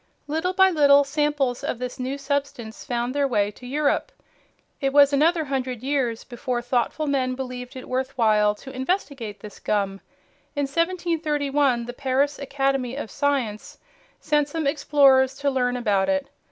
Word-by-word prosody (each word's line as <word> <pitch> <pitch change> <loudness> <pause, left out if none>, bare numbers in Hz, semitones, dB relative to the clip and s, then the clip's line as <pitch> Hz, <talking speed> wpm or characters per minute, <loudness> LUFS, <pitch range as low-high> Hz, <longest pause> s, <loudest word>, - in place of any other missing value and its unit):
Little 320 +5 -1
by 380 0 +5
little 285 -3 +6
samples 280 -3 -1
of 285 - -2
this 250 +1 -6
new 260 +2 -3
substance 275 -5 -3
found 240 +1 -2
their 285 -1 +1
way 205 -5 +1
to 245 +4 -12
Europe. 295 - 0 0.7
It 270 -1 -1
was 285 0 +6
another 320 +4 +3
hundred 255 -3 -3
years 260 -5 -1
before 245 0 -3
thoughtful 245 +5 0
men 260 -3 0
believed 250 -1 -6
it 255 - -8
worth 260 +1 -3
while 210 -3 +3
to 265 +5 -11
investigate 260 - -3
this 210 -2 -10
gum. 195 -2 -1 0.5
In 285 - 0
1731 295 -5 0
the 245 - -6
Paris 280 +2 0
Academy 270 -2 -1
of 280 -6 -6
Science 260 -7 -2 0.4
sent 295 -2 +1
some 320 +1 -3
explorers 275 -2 +4
to 280 0 0
learn 250 -1 0
about 205 -5 +1
it. 285 -1 0
270 Hz, 155 wpm, -24 LUFS, 245-285 Hz, 0.7 s, little